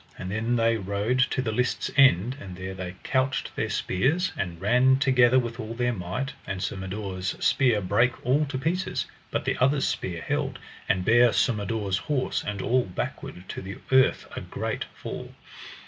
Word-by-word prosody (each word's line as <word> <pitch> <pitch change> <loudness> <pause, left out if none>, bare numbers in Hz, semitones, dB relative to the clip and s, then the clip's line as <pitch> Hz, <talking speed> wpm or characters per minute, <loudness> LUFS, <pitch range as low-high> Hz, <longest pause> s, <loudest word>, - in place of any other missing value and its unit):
And 95 - -5
then 115 +3 0
they 115 -1 +3
rode 100 +5 -1
to 130 - -1
the 110 - -1
lists' 125 +3 -1
end, 125 -4 +5
and 95 -2 -8
there 95 +1 -5
they 95 -1 -6
couched 130 0 0
their - - -1
spears, 160 - +1
and 85 -4 -4
ran 125 +7 +4
together 130 -2 +4
with 120 -1 -1
all 110 0 -5
their 120 0 0
might, 105 +9 -4
and 95 - -3
Sir - - -2
Mador's 95 -1 -4
spear 120 -6 +3
brake 115 +6 +1
all 140 +5 +3
to 135 -1 -3
pieces, 180 +6 -1 0.2
but - - -2
the - - -1
other's 135 +2 +3
spear 85 -3 -3
held, - - -1 0.3
and 95 -2 +1
bare 120 +1 +6
Sir 125 - +2
Mador's 105 -2 -1
horse 140 +1 -1
and 100 -2 -4
all 125 +1 +2
backward 90 0 -6
to - - -5
the 95 +1 -7
earth 130 0 +4
a - - -4
great - - -3
fall. - - -8
115 Hz, 180 wpm, -26 LUFS, 95-130 Hz, 0.3 s, bare